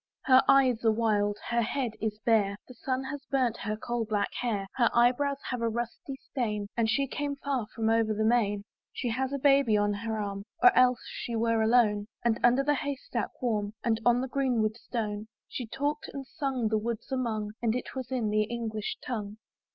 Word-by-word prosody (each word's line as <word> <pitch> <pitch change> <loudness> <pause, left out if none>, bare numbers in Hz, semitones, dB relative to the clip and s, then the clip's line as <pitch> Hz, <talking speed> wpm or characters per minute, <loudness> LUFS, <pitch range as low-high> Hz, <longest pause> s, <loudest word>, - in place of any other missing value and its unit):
Her 260 -1 +7
eyes 255 -4 +4
are 225 - +5
wild, 210 -2 +1
her 235 0 +2
head 240 +1 -1
is 215 -1 -1
bare, 205 -4 +3
The 255 - -11
sun 260 +2 -2
has 275 +1 -6
burnt 255 -4 +1
her 215 +1 -3
coal 240 +1 -2
black 210 -2 -1
hair, 215 -5 -1
Her 235 -3 +4
eye 240 +1 +6
brows 280 +2 -1
have 250 -2 -2
a 230 - +1
rusty 240 +6 -4 0.2
stain, 215 -6 -1
And 230 -2 +1
she 275 +5 +2
came 285 +1 -3
far 275 -5 -2
from 225 -1 0
over 225 -1 +3
the 215 0 0
main. 210 -3 +2 0.3
She 245 - -3
has 260 +3 -1
a 280 - -1
baby 275 -5 +4
on 205 0 +2
her 220 +1 -3
arm, 200 -1 -3 0.2
Or 375 +1 +8
else 250 -1 +4
she 235 - -5
were 230 0 +2
alone; 220 -3 +3 0.2
And 230 -1 +2
underneath 250 +3 +4
the 295 - +3
hay 285 0 -2
stack 265 - -4
warm, 210 -4 0
And 225 -1 +1
on 240 +1 +4
the 260 - -2
green 255 -4 +1
wood 215 0 0
stone, 215 -3 -4 0.2
She 245 - -5
talked 290 +5 -2
and 275 -1 -6
sung 265 -6 -2
the 220 0 +2
woods 230 +3 -4
among; 220 -5 -1
And 230 -1 +1
it 250 - -4
was 260 -2 -5
in 235 -5 0
the 215 0 +2
English 220 -2 -4
tongue. 215 -4 -4
235 Hz, 210 wpm, -29 LUFS, 215-260 Hz, 0.3 s, Or